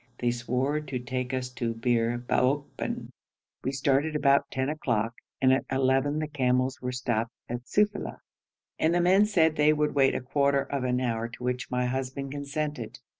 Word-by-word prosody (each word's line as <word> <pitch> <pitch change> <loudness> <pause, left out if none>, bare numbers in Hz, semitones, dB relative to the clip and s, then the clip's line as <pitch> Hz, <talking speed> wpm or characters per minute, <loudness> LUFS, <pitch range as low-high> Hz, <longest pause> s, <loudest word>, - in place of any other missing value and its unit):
They 120 -1 +1
swore 125 +5 -1
to 140 -4 -4
take 125 +1 -3
us 130 -1 -2
to 120 -2 -3
Bir 115 0 +1
Baokban. 130 +4 -1 0.5
We 130 - 0
started 140 +3 +1
about 140 -2 +3
ten 130 0 -1
o'clock, 115 -7 -1 0.3
and 130 -1 +5
at 130 - +2
eleven 135 +2 +2
the 155 0 -1
camels 130 -2 0
were 125 0 -2
stopped 120 -1 -2
at 120 +1 -5
Sufeila, 210 0 0 0.6
and 165 +2 +3
the - - +3
men 190 +4 +5
said 160 -6 +3
they 150 +1 +5
would 150 0 0
wait 135 -2 +3
a - - -1
quarter 140 +1 +2
of 140 -1 -3
an 125 0 +1
hour, 115 -2 -1
to 120 +1 -11
which 125 0 -2
my 125 0 0
husband 130 +2 -3
consented. 145 -3 -4
130 Hz, 175 wpm, -28 LUFS, 125-145 Hz, 0.6 s, and